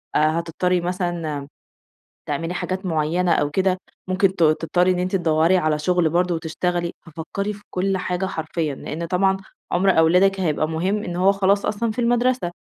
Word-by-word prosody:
آآ - - +4 0.2
هتضطرّي 175 +2 0
مثلًا 175 -5 -3 0.8
تعملي 165 +4 -2
حاجات 185 +1 -3
معيّنة 170 +1 0
أو 145 -3 +2
كده 185 +3 +1 0.3
ممكن 185 +1 +2
ت - - -14
تضطرّي 165 +3 +2
إن 180 - 0
أنتِ 185 +2 -1
تدوّري 165 0 +3
على 155 -3 +1
شُغل 175 +1 +2
برضه 175 +2 +1
وتشتغلي. 170 +1 -2
ففكّري 170 +6 -4
في 205 0 -14
كل 190 +1 0
حاجة 180 0 -2
حرفيًا، 160 -4 -3
لإن 160 +5 -5
طبعًا 190 +3 +2 0.3
عُمر 190 +1 +3
أولادِك 180 +4 +4
هيبقى 155 -3 0
مهم 185 +6 -1
إن 175 -4 -5
هو 185 +2 +4
خلاص 200 0 +2
أصلًا 220 +2 -1
في 220 - -6
المَدرسة، 245 -4 +1
180 Hz, 165 wpm, -22 LUFS, 160-190 Hz, 0.8 s, آآ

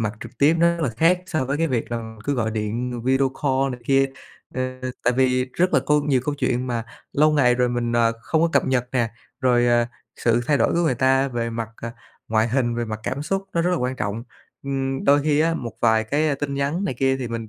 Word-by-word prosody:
mặt 105 -2 -1
trực - - -9
tiếp 150 +4 +5
nó 170 0 +3
rất 165 - -3
là 135 - +1
khác 180 +2 +3
so 155 -6 -1
với 140 +3 -1
cái 165 - +2
việc 120 -4 -2
là 110 -1 -5
cứ 145 - 0
gọi 110 -3 -1
điện 115 +3 -3
video 135 +1 +3
call 135 -1 +1
này 125 - -8
kia. 135 0 +4 0.5
Ờ, 130 - -1 0.4
tại 125 - +4
vì 130 -1 +2
rất 180 +2 +2
là - - +5
câu 150 0 +4
nhiều 135 -4 +2
câu 150 - -1
chuyện 130 -2 -1
mà 115 -2 -2 0.3
lâu 155 +2 +4
ngày 125 -5 +4
rồi 125 0 +1
mình, 120 -1 -1
ờ, 115 -1 +3
không 160 +4 +1
có 170 - +3
cập - - +3
nhật 125 -2 0
nè, 120 -3 +1 0.3
rồi, 120 -2 +3
à, 120 0 +3 0.3
sự 120 0 +2
thay 145 - +3
đổi - - +2
của 170 - +1
người 155 -6 +2
ta 135 +2 +2
về 115 -2 -3
mặt, 115 -1 -4
ờ, 115 - -4 0.4
ngoại 110 +1 +2
hình, 120 -1 0
về 120 0 -2
mặt 110 -1 -5
cảm 140 +4 -3
xúc 195 +5 -1
nó 170 - +1
rất 180 - +1
là 180 - +1
quan 125 -1 -2
trọng. 105 +2 -3 0.4
Ừm, 135 -1 -2
đôi 145 +1 +4
khi 150 0 +2
á, 165 +1 +2
một 120 -6 -5
vài 110 -1 +3
cái, 150 +7 +1
ờ, 145 - +1
tin 140 0 -4
nhắn 145 +8 -1
này 180 - -2
kia 135 +2 +1
thì 125 -2 -4
mình 115 -1 -5
130 Hz, 255 wpm, -23 LUFS, 120-145 Hz, 0.5 s, tiếp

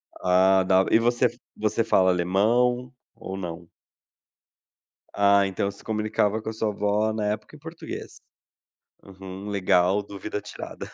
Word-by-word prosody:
Ah, 95 +1 +3
tá, 95 0 +3
e 110 - +6
você 120 +2 +2 0.3
você 110 +2 0
fala 95 -4 +3
alemão? 120 +8 +1 0.2
Ou 95 - -7
não? 85 -2 -7 1.4
Ah, 100 0 +4
então, 95 +1 -2
você 100 - -11
se - - -16
comunicava 110 0 0
com 110 - -5
a - - -5
sua 110 0 -1
avó 105 +1 0
na 110 -1 -2
época 105 +7 -10
em - - -14
português. 160 +2 -9 0.8
Uhum, 95 +1 -9
legal, 95 0 +2
dúvida 100 +1 -6
tirada. - - -8
100 Hz, 145 wpm, -25 LUFS, 95-110 Hz, 1.4 s, e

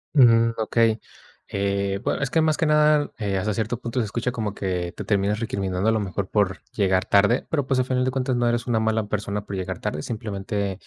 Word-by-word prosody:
Mm, 115 -4 +6
okey. 110 0 +2 0.5
Eh, 100 0 -1
bue - - 0
es 135 - 0
que, 160 - +2
más 155 -1 +2
que - - +1
nada, 150 -1 +3
eh, 100 -3 -1
hasta 105 +3 -1
cierto 115 +3 -2
punto, 120 +1 -3
se 115 - +1
escucha 120 +4 -2
como 110 -4 -3
que 90 -3 -3
te - - -5
terminas 105 0 +1
recriminando 100 -3 -1
a - - +4
lo 110 - +1
mejor 95 -1 -3
por 100 -3 +1
llegar 95 -2 +1
tarde, 100 +4 +3
pero, 145 -4 0
pues, 135 -2 +1
al 130 - +2
final 125 0 0
de 130 - 0
cuentas, 130 0 -1
no 120 0 +1
eres 120 0 0
una 115 -2 +2
mala 110 -1 0
persona 105 0 -3
por 100 - -5
llegar 95 -1 -4
tarde. 75 - -3
Simplemente, 100 -3 -3
110 Hz, 225 wpm, -24 LUFS, 100-120 Hz, 0.5 s, Mm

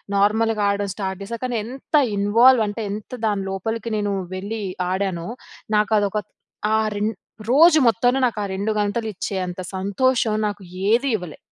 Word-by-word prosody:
నార్మల్‌గా 215 +2 +2
ఆడడం 200 0 -1
స్టార్ట్ 190 -2 -4
చేశా. 230 +3 -6
కానీ 250 -2 -1
ఎంత 265 +6 -5 0.2
ఇన్వాల్వ్ 230 +4 +5
అంటే, 210 +2 -4
ఎంత 210 +1 -7
దాని 205 -2 0
లోపలికి 225 +4 -3
నేను 205 -1 -1 0.2
వెళ్ళి 205 +4 -4 0.3
ఆడానో, 185 -3 -2 0.5
నాకు 210 +1 +1
అదొక 205 0 -1 0.6
ఆ - - +4 0.2
రె 205 - -3 0.5
రోజు 315 +5 +7
మొత్తంలో 245 +3 +3
నాకు 235 -3 -1
ఆ - - -1
2 200 +3 -1
గంటలు 210 +2 -1
ఇచ్చేంత 185 -1 -4 0.2
సంతోషం, 220 +4 +1
నాకు 205 -1 -5 0.3
ఏది 240 +5 +3
ఇవ్వలే. 180 -6 -6
210 Hz, 150 wpm, -22 LUFS, 200-230 Hz, 0.6 s, రోజు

